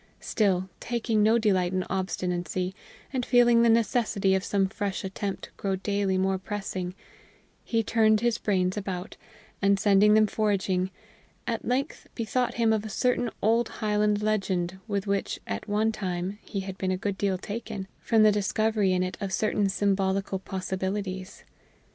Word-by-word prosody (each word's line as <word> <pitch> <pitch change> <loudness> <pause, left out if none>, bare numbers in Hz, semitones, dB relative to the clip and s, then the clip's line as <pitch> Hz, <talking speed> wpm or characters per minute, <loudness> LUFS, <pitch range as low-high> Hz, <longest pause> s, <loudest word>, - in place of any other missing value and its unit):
Still, 190 -4 +1
taking 230 -2 0
no 220 +2 +5
delight 190 -5 +2
in 185 0 0
obstinacy, 180 -1 -2 0.4
and 255 -2 0
feeling 240 -1 +5
the 235 - +5
necessity 225 -4 +2
of 190 0 +1
some 195 -1 +1
fresh 200 0 -3
attempt 195 +1 -4
grow 195 -1 -1
daily 195 0 0
more 190 0 +1
pressing, 190 -3 -4 0.7
he 225 -1 0
turned 220 0 +3
his 235 -1 +1
brains 185 -3 +1
about, 190 -2 -4 0.5
and 200 0 +3
sending 205 +1 +5
them 215 0 +6
foraging, 195 -3 0 0.6
at 230 -1 -2
length 265 +5 -1
bethought 245 +2 -1
him 230 -1 +3
of 215 -1 0
a 220 - -6
certain 245 +2 +1
old 230 +2 +3
Highland 210 -1 0
legend 190 -4 0
with 200 -2 -1
which 200 -1 -1
at 100 - -5
one 215 +2 +2
time 185 -1 -3
he 195 - -4
had 190 0 -7
been 190 - -1
a 185 - 0
good 200 +1 -2
deal 195 -1 0
taken, 210 0 -5
from 225 -2 +3
the 215 - +7
discovery 210 -1 +1
in 180 0 +2
it 185 - -4
of 195 -1 -3
certain 210 -1 +1
symbolical 195 -1 0
possibilities. 190 0 -4
200 Hz, 160 wpm, -27 LUFS, 190-220 Hz, 0.7 s, the